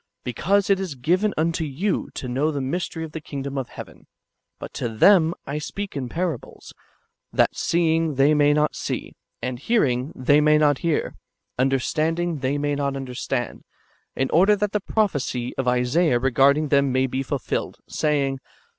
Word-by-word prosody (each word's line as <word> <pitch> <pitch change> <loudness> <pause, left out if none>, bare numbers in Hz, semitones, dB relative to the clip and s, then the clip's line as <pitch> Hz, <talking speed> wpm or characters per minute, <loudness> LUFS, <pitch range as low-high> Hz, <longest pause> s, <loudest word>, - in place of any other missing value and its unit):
— - - -59
"Because 190 - +1
it 195 - +3
is 185 -7 -4
given 180 - +1
vmto 165 +2 0
you 185 +9 -1
to 130 - -5
know 135 +5 0
the 145 -2 -2
mystery 160 +4 -3
of 160 - -7
the 160 - -6
kingdom 140 -1 -6
of 135 -3 -3
heaven; - - -11 0.5
but - - -9
to 120 - -3
them 165 - +5
I 145 +2 -3
speak 200 +5 -6
in 130 -3 -3
parables, 165 -5 -4 0.6
that - - +2
seeing 165 -2 +1
they 140 +3 +4
may 145 -1 +4
not 150 +1 +1
see, - - -4 0.3
and 125 -1 -3
hearing 135 - +1
they 145 +4 +3
may 150 0 +5
not 145 -3 +3
hear, 165 -3 -1 0.5
understanding 155 +5 0
they 135 +2 -1
may 145 0 -1
not 140 -1 -1
understand; 130 -2 -4 0.5
in 135 - -1
order 195 +6 +5
that 205 0 -1
the 210 - 0
prophecy 145 - -1
of 130 - -2
Isaiah 125 +4 +2
regard 135 +3 +4
ing 155 -1 -1
them 140 -1 +3
may 130 +1 +2
be 130 +1 -2
fulfilled, 135 -1 -3
saying. 140 -3 0
145 Hz, 170 wpm, -23 LUFS, 130-165 Hz, 0.6 s, them